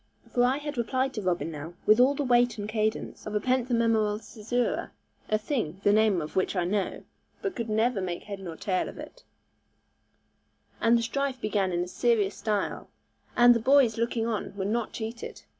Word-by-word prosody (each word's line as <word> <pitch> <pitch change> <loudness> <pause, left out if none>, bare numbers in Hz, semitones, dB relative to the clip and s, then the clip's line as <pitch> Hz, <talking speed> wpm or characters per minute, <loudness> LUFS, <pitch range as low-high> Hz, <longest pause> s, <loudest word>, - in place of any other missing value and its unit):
For 245 - +3
I 255 +2 +3
had 290 -3 -5
replied 260 +3 0
to 215 - -4
Robin 175 -3 -1
now, 155 +3 -8
with 215 +2 +6
all 265 +3 +5
the 285 - -1
weight 245 -2 +3
and 205 0 -4
cadence 215 0 -2
of 210 - -5
penthemimeral 230 -4 +2
caesura 225 +3 -2 0.4
(a 215 - +3
thing, 210 - -3
the 205 - +4
name 210 -6 +3
of 150 - -8
which 185 +1 +1
I 180 - +1
know, 195 +2 -2 0.4
but 395 -2 -2
could 230 -2 -4
never 220 0 +1
make 175 -2 -4
head 200 -2 -7
nor 175 -4 -7
tail 185 +2 -1
of - - -11
it), - - -10 1.6
and 230 +1 +5
the 230 - -1
strife 270 +2 -2
began 205 -4 0
in 175 0 0
a - - -6
serious 210 -1 +1
style, 210 -2 -2 0.5
and 240 0 +8
the 230 - +1
boys 255 -2 +4
looking 230 -1 0
on 220 -4 -3
were 190 - -2
not 225 +2 -1
cheated. 230 +1 -6
220 Hz, 190 wpm, -28 LUFS, 200-245 Hz, 1.6 s, and